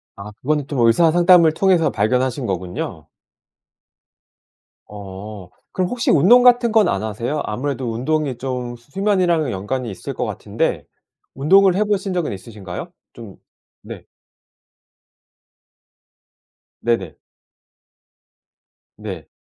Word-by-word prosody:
아 100 +1 -9
그거는 150 0 -1
좀 140 -3 -3
의사 160 +8 +4
상담을 175 -1 +5
통해서 180 -2 +2
발견하신 125 +4 0
거군요. 90 -3 -5 1.8
어. 100 -1 -9 0.2
그럼 185 -1 -1
혹시 245 -1 0
운동 205 - +6
같은 245 -1 +5
건 220 -4 +4
안 - - -1
하세요? 115 +7 -3
아무래도 130 +1 -3
운동이 135 +2 -1
좀 125 -1 -4
수 120 +4 -21
수면이랑은 180 -6 +1
연관이 115 +6 -4
있을 95 - -7
것 - - -3
같은데 - - -3 0.5
운동을 185 +7 +4
해 205 - +2
보신 200 -2 -1
적은 175 - -2
있으신가요? 100 - -8 0.2
좀 115 -6 -11 0.5
네. - - -10 2.8
네네. 115 -8 -1 1.8
네. - - -8
135 Hz, 230 characters per minute, -20 LUFS, 110-175 Hz, 2.8 s, 운동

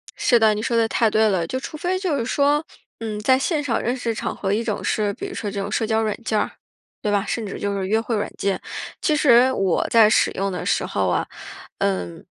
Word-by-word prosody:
是 245 - +3
的， 220 -1 +5
你 210 - -3
说 235 0 0
的 225 -1 +3
太 225 0 +2
对 220 +1 +3
了， 185 -4 0
就 260 - -3
除 275 - -7
非 360 +4 -1
就 365 -6 -1
是 230 - -2
说， 290 +4 +2 0.4
嗯， 220 -2 -4
在 260 +5 +4
现 295 +2 0
场 265 -5 0
认 240 +2 -1
识 235 -3 -2
场 - - -4
合， 195 0 -1
一 220 +3 0
种 215 -3 -3
是 205 -2 0
比 395 - -7
如 380 - -8
说 210 - -4
这 200 0 -4
种 200 +1 -4
社 220 - 0
交 220 0 +1
软 215 -2 -1
件 220 -1 0
儿， - - -1 0.5
对 210 - -1
吧？ 200 0 +1
甚 230 +1 -2
至 195 - -6
就 200 0 -1
是 190 -1 -2
约 220 +3 +2
会 230 0 -2
软 205 - -2
件。 195 -1 -1 0.4
其 305 - +2
实 260 -3 +5
我 195 -8 +1
在 225 -2 +6
使 215 - +3
用 195 +1 -2
的 180 - -4
时 - - +1
候 - - -1
啊， - - 0 0.5
嗯 90 -3 -2
220 Hz, 270 characters per minute, -22 LUFS, 205-260 Hz, 0.5 s, 在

